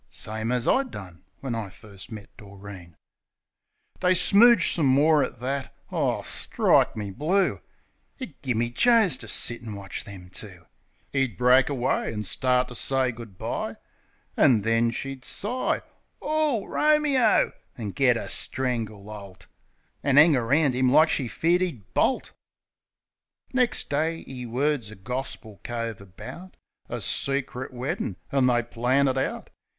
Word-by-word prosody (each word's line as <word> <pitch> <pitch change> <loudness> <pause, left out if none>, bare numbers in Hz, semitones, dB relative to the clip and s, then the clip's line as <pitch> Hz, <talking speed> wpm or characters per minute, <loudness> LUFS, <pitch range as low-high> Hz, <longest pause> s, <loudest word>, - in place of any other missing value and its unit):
(Same 110 +2 -4
as 125 -1 0
I 270 - +4
done 95 - -10 0.2
when 135 -3 -3
I 115 -3 -4
first 100 +1 -13
met 105 -2 -10
Doreen.) 100 -4 -12 1.0
They 185 0 +3
smooge 235 +6 +6
some 155 -5 +1
more 145 +3 +4
at 120 - -5
that. 135 +1 -3 0.2
Ar, - - 0
strike - - +2
me 105 -2 -4
blue 180 - +1
I - - -26 0.6
It 220 - -9
gimme 120 -3 -1
Joes 220 - +4
to - - -4
sit 120 - +1
an' 110 -3 -7
watch 100 -1 -6
them 90 -3 -11
two! 95 -4 -10 0.5
'E'd 135 -8 0
break 125 +4 +4
away 130 -4 -1
an' 105 -1 -4
start 125 +5 +1
to - - -8
say 130 +1 +1
good 115 -5 -11
bye, - - -4 0.6
An' 115 -5 +4
then 115 +1 +2
she'd 135 +2 -5
sigh 245 +5 -2 0.4
"Ow, 300 -8 0
Ro 305 0 +3
me 295 -3 +1
o!" 225 -3 +3 0.3
an' 110 -4 -4
git 125 +1 +3
a - - -5
strangle 115 -6 -1
holt. 100 -3 -11 0.6
An' 140 -1 +1
'ang 150 +1 +8
around 135 +4 +2
'im 130 0 +2
like 155 +3 +6
she 130 - 0
feared 170 +11 +1
'e'd 125 - -4
bolt. 265 - +1 1.2
Nex' 250 -2 +2
day 160 +3 -2
'e 125 -2 -7
words 130 -1 -1
a 110 - -10
gorspil 110 -1 -6
cove 115 -3 -4
about 115 - -11 0.3
A - - -4
secrit 135 -2 -1
weddin'; 160 - -4
an' 135 -3 +3
they 120 -1 +2
plan 125 +4 +1
it 130 0 0
out. - - -4
125 Hz, 155 wpm, -25 LUFS, 110-150 Hz, 1.2 s, ang